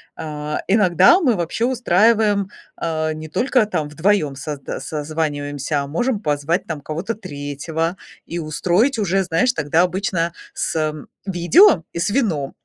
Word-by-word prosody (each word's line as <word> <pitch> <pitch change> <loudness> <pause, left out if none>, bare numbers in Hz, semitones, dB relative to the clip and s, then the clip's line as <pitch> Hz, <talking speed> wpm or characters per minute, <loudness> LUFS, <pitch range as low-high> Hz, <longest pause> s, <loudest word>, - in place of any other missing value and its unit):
А, 150 -1 -4
иногда 205 - +5
мы 250 - +3
вообще 175 +6 -1
устраиваем, 215 -4 +2 0.3
а, 155 -1 -2
не 155 0 -8
только 250 - +2
там 155 -8 -2
вдвоём 155 -2 +1
созда 145 0 -6
созваниваемся, 145 -2 -2
а 140 - -5
можем 215 - -1
позвать 150 +1 -1
там 155 -3 -4
кого-то 165 +10 -4
третьего 160 -1 -4 0.3
и 170 - -5
устроить 175 - +1
уже, 195 -1 +1
знаешь, 180 +8 +1
тогда 155 +1 +2
обычно 180 -2 -1 0.2
с 155 -1 -1 0.3
видео 190 - +5
и 170 - -4
с 180 - 0
вином, 185 - 0
170 Hz, 140 wpm, -20 LUFS, 150-205 Hz, 0.3 s, иногда